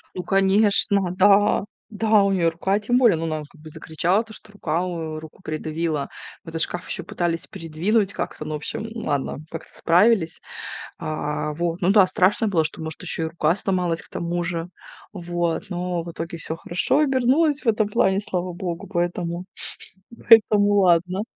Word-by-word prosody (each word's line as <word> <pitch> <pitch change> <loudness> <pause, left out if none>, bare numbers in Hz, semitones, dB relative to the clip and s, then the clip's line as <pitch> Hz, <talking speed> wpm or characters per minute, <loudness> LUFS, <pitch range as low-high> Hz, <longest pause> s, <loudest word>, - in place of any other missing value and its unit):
Ну 180 - -3
конечно, 195 0 +3
да, 200 +1 +4 0.2
да 215 -1 +3
у 200 - +2
нее 175 -4 +2
рука 190 +4 0
тем 240 +4 +1
более, 230 -9 +5
ну, 160 - -4
она 155 -1 -2
как 160 - -20
бы 155 - -11
закричала, 175 +8 0
то 225 - -15
что 220 -1 -11
рука 170 -5 -2 0.4
руку 160 +4 -13
придавила 155 -1 -2 0.4
в 165 - -9
этот 165 0 -4
шкаф, 175 +1 -3
еще - - -2
пытались 170 -1 -2
придвинуть 195 +3 -1
как-то, 150 - -5
ну 155 - -4
в - - -1
общем 150 +8 -3
ладно, 145 - -2
как-то 165 - -9
справились. 180 0 +3 0.6
А 150 -1 -3
вот, 170 +2 -2
ну 180 0 +2
да, 200 -2 +6
страшно 185 +4 +2
было, 170 -5 +2
что 155 - -5
может 160 -1 -6
еще - - -3
и - - 0
рука 160 +1 +1
сломалась 180 -5 -1
к - - -19
тому 175 +1 -2
же, 170 -1 -3 0.5
вот, 175 -2 -2
но 180 -1 -2
в 170 - -7
итоге 165 +1 -5
всё 160 0 -5
хорошо 175 - +1
обернулось 285 +2 +2
в - - -13
этом 215 -1 +2
плане, 200 -3 +2
слава 180 -3 -3
богу, 175 -1 -5
поэтому 175 -1 -2 0.8
поэтому 210 -2 +6
ладно. 185 0 +3
180 Hz, 175 wpm, -23 LUFS, 165-205 Hz, 0.8 s, да